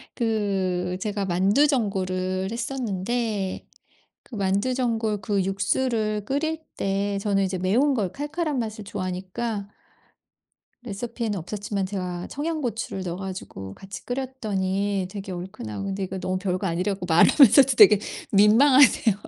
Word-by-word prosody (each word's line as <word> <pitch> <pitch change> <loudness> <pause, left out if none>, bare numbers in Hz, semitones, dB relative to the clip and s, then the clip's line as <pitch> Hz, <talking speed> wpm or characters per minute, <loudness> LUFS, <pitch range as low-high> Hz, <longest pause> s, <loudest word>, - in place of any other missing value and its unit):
그 190 -5 -1
제가 205 0 -2
만두전골을 190 -3 +1
했었는데 230 -4 -2 0.6
그 235 - -11
만두전골 220 +2 0
그 200 -3 0
육수를 210 +2 0
끓일 315 +5 -1 0.2
때 200 +1 -1
저는 195 -1 +1
이제 185 -1 -1
매운 235 +11 +2
걸, 200 -7 -1
칼칼한 295 - -2
맛을 215 -2 -4
좋아하니까 195 +2 -4 1.1
레시피에는 225 -1 -4
없었지만 200 +2 -3
제가 180 -2 -4
청양고추를 275 - -3
넣어 175 -1 -4
가지고 185 - -7
같이 195 0 -10
끓였더니 205 -7 -2
되게 195 -2 -6
얼큰하고 180 - -6
근데 195 0 -3
이거 190 +1 -5
너무 185 0 -2
별거 185 0 -2
아니라 180 +3 0
갖고 180 -2 -7
말하면서도 265 - +6
되게 210 -1 +8 0.3
민망하네요. 230 +2 +6
200 Hz, 310 characters per minute, -24 LUFS, 190-235 Hz, 1.1 s, 되게